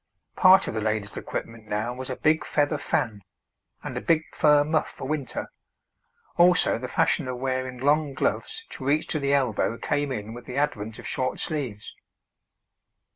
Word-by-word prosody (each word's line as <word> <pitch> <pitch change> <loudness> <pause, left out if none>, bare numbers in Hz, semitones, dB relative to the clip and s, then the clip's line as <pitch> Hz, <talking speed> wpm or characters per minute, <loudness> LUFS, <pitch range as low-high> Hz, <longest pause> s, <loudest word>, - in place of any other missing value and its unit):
Part 190 0 +6
of - - -3
the 110 - -2
lady's 105 -1 -1
equipment 115 -1 -6
now 110 +3 -2
was 130 +1 -6
a 130 - -2
big 155 +4 +2
feather 145 0 0
fan, 105 -3 -1 0.6
and - - -5
a - - -2
big 165 -1 +2
fur 150 -1 +5
muff 155 +1 0
for 130 - -7
winter; 145 -3 -3 0.9
also 175 -7 +5
the 125 - -4
fashion 130 +2 +1
of 125 -1 -3
wearing 130 0 -2
long 145 +2 +1
gloves 445 - -1
to - - -7
reach 150 +2 +2
to 155 - 0
the 140 -1 0
elbow 120 -4 +1
came 145 +1 -1
in 110 -3 -4
with 120 +1 -10
the 125 - -6
advent 110 -7 -1
of - - -10
short 130 0 -2
sleeves. 125 -9 -3
130 Hz, 175 wpm, -26 LUFS, 115-150 Hz, 0.9 s, Part